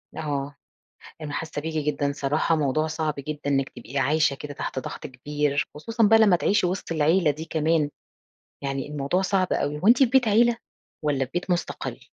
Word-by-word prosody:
آه، 145 -2 -3 0.7
أنا 150 -1 -5
حاسّة 155 -1 -4
بيكِ 160 +1 -4 0.2
جدًا 140 0 -1
صراحة 150 +3 +1
موضوع 155 +1 +1
صعب 155 -1 -2
جدًا 150 +2 -5
إنِّك 135 -1 +1
تبقي 120 +3 -8
عايشة 145 +2 +2
كده 145 +1 -7
تحت 135 - -4
ضغط - - -7
كبير، 145 +2 -1
خصوصًا 225 +10 -1
بقى 225 +1 +6
لمّا 210 -5 +6
تعيشي 180 +3 +2
وِسط 180 -1 -4
العيلة 160 +1 +3
دي 155 +3 -7
كمان، 160 -1 +1 0.7
يعني 135 0 -2
الموضوع 145 +5 -1
صعب 190 -1 +1
أوي 145 +1 -1
هو 190 - 0
أنتِ 240 +2 +7
في 270 - +6
بيت 250 -1 +3
عيلة؟ 235 +2 +4 0.5
والَّا 140 -3 +1
في 130 - -20
بيت 175 +1 -3
مُستقلّ؟ 175 0 -2
150 Hz, 185 wpm, -25 LUFS, 145-180 Hz, 0.7 s, أنتِ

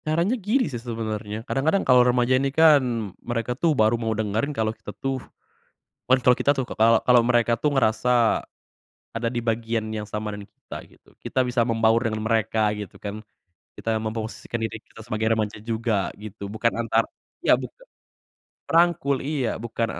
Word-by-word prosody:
Caranya 170 +8 +1
gini 240 +3 +1
sih 125 -6 -5
sebenernya 110 -2 -5
kadang-kadang 160 +8 0
kalo 125 -1 +6
remaja 125 +1 +2
ini 140 - +1
kan, 130 - +3
mereka 120 0 -2
tuh 150 +3 +1
baru 110 +2 +3
mau 110 -2 -1
dengerin 110 +5 -1
kalo 110 -6 -1
kita 110 -2 -11
tuh, 135 -1 -2 0.9
kan 130 +1 +4
kalo 125 +1 +6
kita - - +2
tuh 135 - -1
k 125 - -9
kalau 115 0 +5
kalau 125 -1 +5
mereka 120 -1 +2
tuh 145 +4 0
ngerasa 110 -2 +2 1.0
ada 115 +1 -3
di 120 - -1
bagian 115 -1 -1
yang 110 -1 -4
sama 105 0 -4
dengan 100 -1 -7
kita - - -13
gitu, - - -23 0.2
kita 130 - +1
bisa 120 -2 +1
membaur 115 0 +2
dengan 110 -1 -1
mereka 110 -1 +1
gitu 105 -3 -9
kan, 105 +1 -6 0.5
kita 115 - -1
memposisikan 110 +1 -4
diri 110 0 -4
kita 110 - -15
sebagai 110 -1 -1
remaja 105 -1 -3
juga 110 -3 -1
gitu, 100 -1 -8
bukan 115 +2 0
antar 115 -1 +1 0.4
ya, - - +7
buka - - -6 0.8
rangkul, 165 -5 +2
iya. 140 -4 -1
Bukan 115 0 -3
115 Hz, 170 wpm, -24 LUFS, 110-130 Hz, 1.0 s, ya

